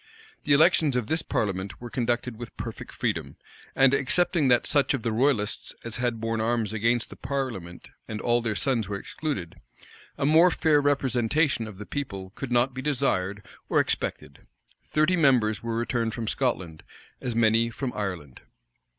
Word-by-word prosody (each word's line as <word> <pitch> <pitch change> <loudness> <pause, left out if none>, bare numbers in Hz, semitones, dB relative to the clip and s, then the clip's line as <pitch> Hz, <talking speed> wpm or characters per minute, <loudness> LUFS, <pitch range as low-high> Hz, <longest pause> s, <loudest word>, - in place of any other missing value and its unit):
The 145 - +4
elections 155 -2 +4
of 125 -3 0
this 160 +7 0
parliament 95 - -2
were 120 -1 -8
conducted 120 -1 -1
with 120 +1 -9
perfect - - -7
freedom; - - -2 0.4
and, 135 0 +5
excepting 155 +3 +2
that 125 -1 +4
such 145 -1 +2
of 120 - -6
the 115 - 0
royalists 110 -3 0
as 115 -2 -5
had 120 -2 -1
borne 115 0 -1
arms 115 -1 0
against 115 +2 +1
the - - -8
parliament 120 -11 -5 0.2
and 110 -1 -5
all 120 +1 +2
their 115 -2 -2
sons 115 -5 0
were 100 - -2
excluded, 115 - -5 0.6
a - - 0
more 160 +5 +6
fair 155 -3 +3
representation 135 -2 +1
of 105 -3 -10
the 105 - -8
people 100 -10 -5
could 135 -3 -6
not 120 +2 +3
be 130 - -5
desired 105 -9 -1 0.2
or - - +3
expected. 70 - -2 0.4
Thirty 155 +4 +2
members 125 -9 +3
were 115 -1 -3
returned 115 -1 -1
from 115 -2 -4
Scotland; 95 -12 -2 0.4
as 120 -2 -3
many 115 0 +3
from 125 +2 -4
Ireland. 90 -10 -5
120 Hz, 165 wpm, -26 LUFS, 110-140 Hz, 0.6 s, more